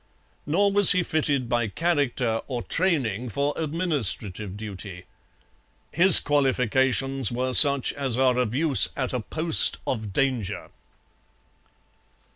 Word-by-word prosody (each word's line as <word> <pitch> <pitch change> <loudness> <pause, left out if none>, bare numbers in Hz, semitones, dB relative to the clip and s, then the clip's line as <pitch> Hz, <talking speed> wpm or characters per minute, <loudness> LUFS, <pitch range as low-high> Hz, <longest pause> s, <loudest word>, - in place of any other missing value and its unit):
Nor 200 +7 0
was 205 0 +7
he 180 0 -1
fitted 145 -6 -2
by 120 -1 -2
character 130 - -3
or 125 -3 -6
training 130 - -3
for 140 +7 -3
administrative 130 - -3
duty. 100 -3 -9 0.9
His 180 +1 +9
qualifications 135 -2 -2
were 130 +1 -4
such 140 -1 +4
as 135 -4 -3
are 130 -1 0
of 120 -2 -3
use 150 -1 +3
at 130 -2 -5
a 125 - -3
post 160 +7 0
of 110 -5 -6
danger. 115 -4 -4
130 Hz, 115 wpm, -22 LUFS, 115-150 Hz, 0.9 s, His